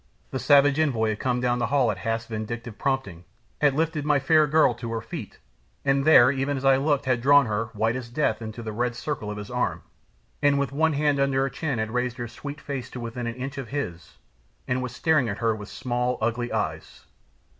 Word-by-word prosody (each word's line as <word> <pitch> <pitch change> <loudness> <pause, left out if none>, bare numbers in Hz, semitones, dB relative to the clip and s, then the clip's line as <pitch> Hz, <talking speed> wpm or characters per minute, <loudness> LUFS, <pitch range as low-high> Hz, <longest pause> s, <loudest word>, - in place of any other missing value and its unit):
The 130 - -2
savage 145 +1 +5
envoy 120 -8 +1
had 110 0 -3
come 125 -1 0
down 125 0 +1
the - - 0
hall 135 -4 +2
at - - -6
Hath's 115 0 -2
vindictive 115 +1 -6
prompting, 130 -11 -2 0.4
had 145 -2 +4
lifted 160 -1 0
my 145 0 +3
fair 155 +3 +4
girl 155 -3 +4
to 115 0 -6
her 115 - -1
feet, 140 -8 -8 0.5
and 135 0 +2
there, 130 -5 +7
even 140 +1 -1
as 135 - -5
I 135 -1 +6
looked, 145 0 +1
had 130 -2 +1
drawn 140 +2 +6
her, 110 0 -1
white 110 +2 0
as 125 -2 -5
death, 120 -4 0
into 110 +1 -7
the 110 - -4
red 120 +2 -1
circle 115 -4 -4
of 105 - -5
his 105 0 -7
arm, - - -1 0.6
and 145 -1 +4
with 140 -2 -1
one 160 +3 +2
hand 145 -1 +1
under 135 -1 +2
her 135 - 0
chin 140 -1 -2
had 110 0 -2
raised 125 0 -1
her 120 -1 -4
sweet 145 +6 -8
face 135 -5 -5
to 125 - -8
within 120 +1 -5
an 115 - -4
inch 135 +2 -5
of 130 - -6
his, 90 - -5 0.5
and 125 +1 0
was 125 -2 -5
staring 155 -7 +2
at 100 - -3
her 115 -1 +1
with 105 -1 -9
small, 125 -1 -2
ugly 120 +2 -1
eyes. - - -4
125 Hz, 225 wpm, -25 LUFS, 115-140 Hz, 0.6 s, there